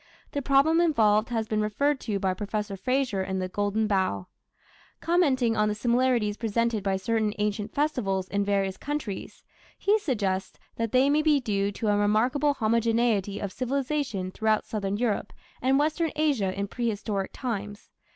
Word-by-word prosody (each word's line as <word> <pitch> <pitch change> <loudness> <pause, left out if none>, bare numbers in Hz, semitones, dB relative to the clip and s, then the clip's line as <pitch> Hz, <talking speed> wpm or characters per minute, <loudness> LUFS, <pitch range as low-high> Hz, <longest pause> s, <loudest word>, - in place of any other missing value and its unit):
The 285 - -2
problem 280 +5 +4
involved 220 -9 +3
has 225 -2 -1
been 215 0 0
referred 275 +7 +1
to 210 -5 -2
by 190 -1 0
Professor 205 +1 -3
Frazer 250 0 0
in 190 0 -2
the 185 0 -2
Golden 205 +3 0
Bough. 190 - 0 0.7
Commenting 275 -9 +2
on 215 -1 +2
the 210 - -1
similarities 235 -2 +1
presented 230 -1 0
by 195 -1 +1
certain 215 +1 0
ancient 210 0 -2
festivals 210 -11 0
in 200 0 0
various 195 -1 0
countries, 285 -9 -5 0.3
he 420 +2 +2
suggests 200 - -2 0.2
that 230 -1 -2
they 260 +2 +4
may 295 +2 +3
be 305 -2 +3
due 200 -5 -1
to 215 +1 -2
"a 205 - +3
remarkable 245 +8 +2
homogeneity 225 -3 +1
of 200 - -4
civilization 255 -6 -2
throughout 220 +1 +1
Southern 205 -2 -2
Europe 215 -3 -1 0.3
and 265 +2 +3
Western 310 +2 +1
Asia 285 -11 +1
in 200 +1 -3
prehistoric 210 -3 -2
times. 205 -5 -5
220 Hz, 160 wpm, -27 LUFS, 200-260 Hz, 0.7 s, problem